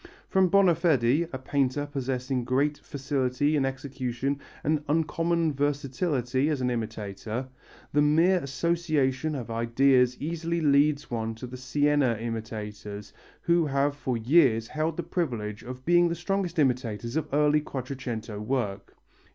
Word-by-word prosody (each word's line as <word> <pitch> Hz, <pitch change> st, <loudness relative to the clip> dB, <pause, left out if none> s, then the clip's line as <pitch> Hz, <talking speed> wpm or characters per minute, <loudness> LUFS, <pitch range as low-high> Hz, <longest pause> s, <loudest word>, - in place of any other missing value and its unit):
From 190 Hz, -2 st, +3 dB
Bonafedi, 170 Hz, -6 st, +3 dB
a 130 Hz, -, -4 dB
painter 135 Hz, +1 st, 0 dB
possessing 130 Hz, -2 st, -2 dB
great 140 Hz, +4 st, 0 dB
facility 140 Hz, +1 st, -1 dB
in 140 Hz, -2 st, +2 dB
execution 135 Hz, 0 st, -3 dB, 0.2 s
and 155 Hz, 0 st, +1 dB
uncommon 165 Hz, +1 st, +1 dB
versatility 140 Hz, -1 st, 0 dB
as 150 Hz, -3 st, 0 dB
an 125 Hz, -1 st, 0 dB
imitator, 110 Hz, +1 st, -4 dB, 0.5 s
the 145 Hz, -, +4 dB
mere 165 Hz, +5 st, +4 dB
association 155 Hz, -1 st, 0 dB
of 120 Hz, -4 st, -5 dB
ideas 125 Hz, +2 st, +3 dB
easily 170 Hz, +2 st, -2 dB
leads 145 Hz, -1 st, +2 dB
one 115 Hz, -1 st, -2 dB
to 110 Hz, -, -8 dB
the 125 Hz, +1 st, -8 dB
Siena 135 Hz, 0 st, +1 dB
imitators 105 Hz, -3 st, -6 dB, 0.3 s
who 170 Hz, -2 st, +2 dB
have 140 Hz, +1 st, +1 dB
for 130 Hz, -4 st, -2 dB
years 115 Hz, -2 st, +3 dB
held 155 Hz, +2 st, -2 dB
the 175 Hz, -, -2 dB
privilege 120 Hz, -, -3 dB
of 125 Hz, +1 st, -9 dB
being 175 Hz, 0 st, +4 dB
the 170 Hz, -, -1 dB
strongest 180 Hz, 0 st, -2 dB
imitators 120 Hz, -4 st, 0 dB
of 160 Hz, -, 0 dB
early 150 Hz, +1 st, +3 dB
Quattrocento 125 Hz, -6 st, -5 dB
work. 105 Hz, -3 st, -3 dB
135 Hz, 135 wpm, -27 LUFS, 125-155 Hz, 0.5 s, the